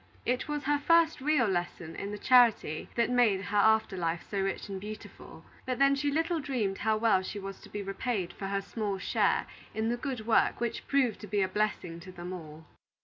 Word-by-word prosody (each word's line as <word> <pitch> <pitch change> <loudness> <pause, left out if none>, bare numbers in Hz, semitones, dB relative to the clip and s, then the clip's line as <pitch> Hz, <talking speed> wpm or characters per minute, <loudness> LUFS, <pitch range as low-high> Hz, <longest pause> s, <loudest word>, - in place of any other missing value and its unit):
It 250 +3 0
was 295 -1 -3
her 290 +1 +1
first 330 0 +3
real 290 -3 +3
lesson 175 -4 -3
in 200 - -4
the 210 - -4
charity 235 -10 +4
that 235 +1 +2
made 235 -6 +4
her 200 +2 -2
after 220 -1 +4
life 170 -2 -2
so 200 - -2
rich 195 +2 -2
and 195 -2 -6
beautiful; 215 +1 -10 0.2
but 255 -1 -2
then 275 0 +5
she 285 +1 0
little 325 +3 0
dreamed 245 -9 -2
how 220 0 +1
well 215 -4 +3
she 190 - -6
was 195 -1 -7
to - - -13
be 205 -1 -5
repaid 195 -2 -2
for 195 - -5
her 200 0 -1
small 205 -2 -3
share 190 - +1 0.3
in 220 +1 0
the 240 - 0
good 250 -4 -4
work 225 - +3
which 235 -1 -3
proved 260 -6 +2
to 210 - -9
be 205 0 +1
a - - +1
blessing 185 -4 -2
to 185 +2 -10
them 180 0 -7
all. 160 -2 -9
215 Hz, 215 wpm, -30 LUFS, 195-250 Hz, 0.3 s, then